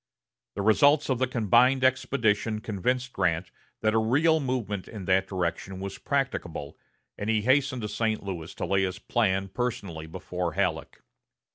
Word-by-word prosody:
The 100 - -2
results 145 +7 +4
of 125 - 0
the 130 - +2
combined 125 +3 +3
expedition 120 -5 +1
convinced 125 +5 -2
Grant 85 +2 0 0.3
that 110 0 +2
a 110 - +4
real 150 +9 +3
movement 120 -8 -2
in 105 -4 -8
that 95 +1 +2
direction 95 +1 -3
was 100 0 -6
practicable, 120 - -2 0.4
and 105 - -2
he 110 -2 +2
hastened 130 -1 +2
to - - -1
St. 110 0 -1
Louis 90 -5 -6
to - - -3
lay 95 0 +2
his 95 -1 -1
plan 95 -5 0
personally 95 -8 -4
before 90 0 -4
Halleck. - - -2
110 Hz, 155 wpm, -27 LUFS, 95-130 Hz, 0.4 s, results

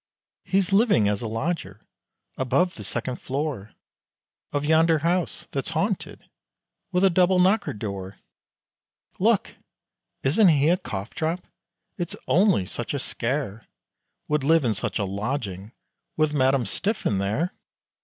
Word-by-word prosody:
"He's 195 0 +1
living 195 - +4
as 105 -1 0
a 115 - -3
lodger, 115 - -3 0.5
above 135 +8 +1
the 105 - -9
second 125 +5 -3
floor 135 -6 -4 0.8
Of 145 0 -1
yonder 160 +1 +4
house, 175 +1 0
that's - - -2
haunted, - - -2 0.6
with 185 0 +3
double 185 +1 +4
knockered 190 - +2
door, 100 -2 -5 1.0
Look! - - +2 0.7
isn't 175 +10 +5
he 150 -2 +4
a 175 - +4
cough 100 - -6
drop? 165 +3 -1 0.6
it's 175 - -3
only 185 - +4
such 120 +8 -4
a - - 0
scare, 120 -4 -3 0.6
Would 150 -2 0
live 160 0 +4
in 115 - +2
such 105 -1 -2
a 100 - 0
lodging, 100 -1 -4 0.5
with 155 -1 +2
Madam 135 -3 +2
Stiffin 105 - -1
there!" 110 - -1
140 Hz, 130 wpm, -25 LUFS, 105-175 Hz, 1.0 s, isn't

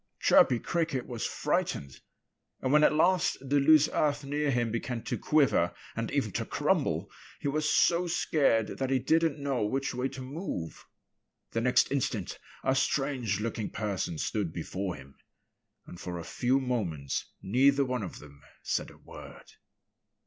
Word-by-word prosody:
Chirpy 125 - +5
Cricket 160 -2 -1
was 120 -2 -3
frightened. 70 -2 -2 0.6
And 130 +1 0
when 150 0 +6
at - - +6
last 180 +3 +3
the 140 +2 +1
loose 155 +1 +6
earth 150 -1 +1
near 145 +1 -1
him 120 -3 0
began 115 +1 -3
to - - -2
quiver 135 - +2 0.2
and - - -2
even - - -1
to - - -2
crumble - - 0 0.3
he - - -3
was 150 +2 0
so 175 +1 +3
scared 140 -10 +1
that 135 -1 -1
he 135 - +3
didn't 160 +4 +2
know 140 -5 -1
which 135 +6 -1
way 125 +1 -1
to 130 - -8
move. 130 - -6 0.6
The 115 - -1
next 125 +2 +3
instant 120 -8 -2 0.2
a 130 - +2
strange 135 -6 0
looking 110 -1 -3
person 100 -6 -3
stood 100 0 -2
before 90 +3 -4
him. 70 -1 -14 0.7
And 90 - -11
for 90 -1 -5
a 85 - -6
few 125 +9 +1
moments 95 - -2 0.2
neither 135 +6 +3
one 125 -2 -2
of 95 - -6
them 70 -1 -14 0.2
said - - -1
a - - -16
word. - - -12
130 Hz, 160 wpm, -29 LUFS, 105-145 Hz, 0.7 s, when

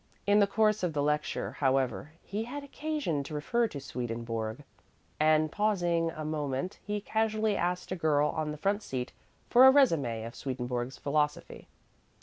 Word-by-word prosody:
In 205 +1 +5
the 200 - +5
course 215 +1 +2
of 180 -3 -1
the 145 -1 0
lecture, 150 +1 -1
however, 135 +2 0
he 210 +3 -4
had 285 +4 -6
occasion 285 - -2
to 145 +2 -7
refer 235 +11 +1
to 145 - -7
Swedenborg, 115 -1 -4 0.6
and, 155 0 +3
pausing 175 -6 +1
a 155 -1 -6
moment, 150 +2 -3
he 210 0 -2
casually 220 0 0
asked 180 0 -2
a - - 0
girl 150 -3 +2
on 155 0 -2
the 150 - -5
front 200 +6 0
seat 130 -9 -4 0.4
for 255 +2 +8
a - - +9
résumé 150 - +3
of 115 - -7
Swedenborg's 125 -1 -4
philosophy. 150 +1 -2
155 Hz, 160 wpm, -30 LUFS, 140-210 Hz, 0.6 s, a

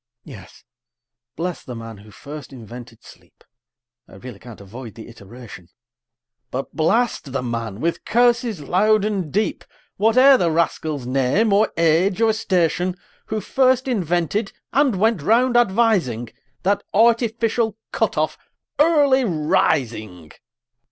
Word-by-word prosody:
Yes - - -13 0.7
bless 175 +2 -4
the 125 - -8
man 115 -1 -9
who 105 +2 -16
first 145 +6 -10
invented 120 -1 -11
sleep, - - -19 0.6
(I - - -16
really 105 +1 -10
can't 120 -2 -12
avoid 110 +4 -10
the 115 - -11
iteration;) 110 -4 -13 0.8
But 135 +2 -6
blast 195 - 0
the 135 - -2
man, 115 -4 -4
with 170 +5 -2
curses 235 -5 +1
loud 205 +7 +2
and 195 -8 -2
deep, 210 +3 -1 0.3
Whate'er 255 +6 +5
the 175 -7 +1
rascal's 155 -4 -1
name, 135 - +1
or 210 +1 +3
age, 170 +4 +2
or 225 -1 +3
station, 180 -3 0 0.3
Who 215 -1 -3
first 260 +4 +1
invented, 195 - -1 0.2
and 260 -7 +2
went 220 -4 +2
round 240 - +2
advising, 190 - +2 0.3
That 200 +2 +1
artificial 230 0 +2
cut - - -1
off - - -1 0.4
Early 290 -4 +4
Rising! 135 - -1
180 Hz, 125 wpm, -21 LUFS, -, 0.8 s, Whate'er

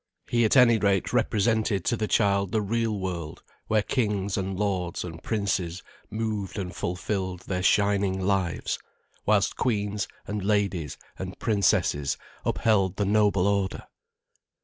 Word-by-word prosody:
He 120 -1 +2
at 110 - +3
any 120 -3 +6
rate 100 -3 +1
represented 110 -2 +1
to - - +2
the 110 -1 -2
child 100 -3 +2
the 110 - +1
real 115 +1 0
world, 85 -4 -5 0.2
where 110 -1 +2
kings 105 -6 0
and 95 -1 -2
lords 95 -4 -1
and 80 -2 -8
princes 95 -5 -1 0.3
moved 110 -3 -3
and 90 -3 -4
fulfilled 90 0 -3
their 90 -1 -3
shining 100 -1 +2
lives, 95 -2 0 0.5
whilst 105 -2 +2
queens 105 -4 -1 0.2
and 105 -1 -3
ladies 100 -7 0 0.2
and 95 0 -6
princesses 100 - +1 0.3
upheld 100 -5 +2
the 100 - 0
noble 100 -2 +3
order. 100 -1 0
100 Hz, 135 wpm, -26 LUFS, 95-105 Hz, 0.5 s, any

